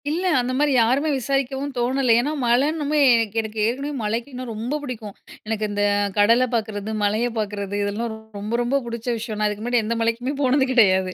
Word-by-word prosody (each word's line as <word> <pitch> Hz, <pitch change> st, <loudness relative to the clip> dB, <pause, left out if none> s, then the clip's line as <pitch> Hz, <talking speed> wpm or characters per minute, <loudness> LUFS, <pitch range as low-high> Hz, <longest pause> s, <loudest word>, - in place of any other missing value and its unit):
இல்ல. 335 Hz, +5 st, -1 dB
அந்தமாரி 255 Hz, +4 st, +1 dB
யாருமே 255 Hz, +6 st, +3 dB
விசாரிக்கவும் 275 Hz, +1 st, -2 dB
தோணல. 250 Hz, 0 st, +2 dB
ஏன்னா, 280 Hz, +5 st, 0 dB
மழைன்னுமே 295 Hz, +5 st, +1 dB, 0.2 s
எனக்கு, 225 Hz, -2 st, -1 dB
எனக்கு 220 Hz, 0 st, -6 dB
ஏற்கனவே 270 Hz, +6 st, -2 dB
மழைக்கு 230 Hz, +6 st, -2 dB
இன்னும் 250 Hz, -1 st, -6 dB
ரொம்ப 235 Hz, +7 st, -3 dB
புடிக்கும். 225 Hz, -7 st, -6 dB, 0.3 s
எனக்கு 215 Hz, -1 st, -1 dB
இந்த 205 Hz, 0 st, 0 dB, 0.3 s
கடல 230 Hz, +5 st, +5 dB
பார்க்கிறது, 215 Hz, -2 st, -2 dB
மலைய 215 Hz, +4 st, +1 dB
பார்க்கிறது 205 Hz, -2 st, -3 dB
இதெல்லாம் 215 Hz, +3 st, -2 dB, 0.3 s
ரொம்ப, 210 Hz, +3 st, -4 dB
ரொம்ப 265 Hz, +4 st, +1 dB
பிடிச்ச 235 Hz, 0 st, -6 dB
விஷயம். 220 Hz, -1 st, -5 dB
நான் 210 Hz, -, +2 dB
அதுக்கு 210 Hz, +1 st, -4 dB
முன்னாடி 240 Hz, -1 st, +1 dB
எந்த 230 Hz, +1 st, -1 dB
மலைக்குமே 230 Hz, +4 st, -1 dB
போனது 265 Hz, 0 st, +3 dB
கிடையாது. 190 Hz, -6 st, +4 dB
235 Hz, 175 wpm, -22 LUFS, 215-265 Hz, 0.3 s, கடல